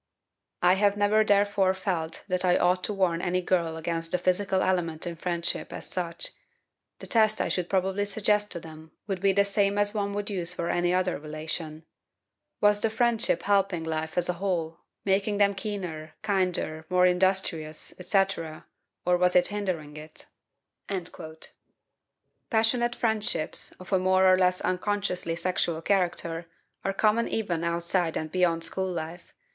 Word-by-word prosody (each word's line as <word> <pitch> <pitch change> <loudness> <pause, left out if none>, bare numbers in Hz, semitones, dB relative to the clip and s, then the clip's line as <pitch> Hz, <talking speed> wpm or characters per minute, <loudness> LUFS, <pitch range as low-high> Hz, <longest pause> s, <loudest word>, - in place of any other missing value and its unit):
I 180 +1 +6
have 200 +1 +2
never 210 +1 +4
therefore 200 -2 +3
felt 175 -4 -3
that 185 -1 0
I 180 -1 +4
ought 180 +1 +2
to 210 - -2
warn 175 -3 +1
any 180 +1 0
girl 170 -3 0
against 165 0 -3
the - - +2
physical 185 +2 +1
element 170 -3 0
in 170 -1 -4
friendship, 170 0 -1
as - - -7
such. 170 -2 -4 0.7
The - - -9
test 215 -2 +3
I - - 0
should 180 -2 -1
probably 195 +1 +1
suggest 210 0 +1
to 170 - -4
them 160 -1 -12
would 195 -3 -3
be 195 0 +4
the 200 +1 +4
same 200 0 +1
as 205 0 +2
one 200 -2 -2
would 205 0 -3
use 180 -2 -3
for 170 -1 -1
any 175 0 +1
other 185 -2 +1
relation 155 +1 -5 0.7
was 205 0 +4
the 225 - +1
friendship 235 0 +1
helping 195 -4 +2
life 160 0 -3
as 175 - +2
a 180 - +1
whole, 170 -4 -1 0.3
making 200 +1 +1
them 200 -1 +4
keener, 185 -6 -5
kinder, 185 -6 0
more 180 0 +4
industrious, 180 -4 0
etc., 180 -4 0 0.4
or 180 0 +4
was 180 0 +2
it 180 0 +4
hindering 185 -8 -3
it?" 155 +1 -10 2.2
Passionate 240 0 +2
friendships, 220 -7 0
of 185 +2 -9
a 190 - +4
more 185 0 +3
or 185 0 +7
less 180 0 +2
unconsciously 185 -2 -1
sexual 170 -1 0
character, 170 -2 0 0.4
are 195 - 0
common 215 +3 +2
even 175 -7 -2
outside 170 0 0
and 155 0 -4
beyond 170 -2 +1
school 190 +3 -1
life. 170 +1 -6
185 Hz, 160 wpm, -27 LUFS, 170-200 Hz, 2.2 s, or